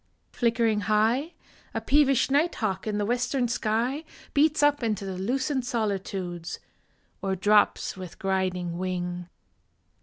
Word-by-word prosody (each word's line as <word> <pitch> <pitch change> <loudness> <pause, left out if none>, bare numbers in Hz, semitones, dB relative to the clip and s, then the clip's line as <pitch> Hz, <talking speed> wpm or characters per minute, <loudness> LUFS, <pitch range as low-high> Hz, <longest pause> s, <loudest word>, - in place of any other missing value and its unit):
Flickering 230 -3 +1
high, 230 +9 +2 0.4
A - - +1
peevish 275 +2 +3
night 305 +5 +2
hawk 195 -2 -2
in 210 -1 -1
the 205 - 0
western 245 +2 0
sky 235 +5 0 0.3
Beats 300 +1 +3
up 290 -1 +4
into 215 -4 -1
the 190 -1 -4
lucent 260 +6 0
solitudes, 195 -7 -3 0.6
Or 195 -1 -1
drops 205 +2 +3
with 185 -3 -9
griding 185 -3 -1
wing. 180 -1 -3
215 Hz, 125 wpm, -27 LUFS, 190-255 Hz, 0.6 s, up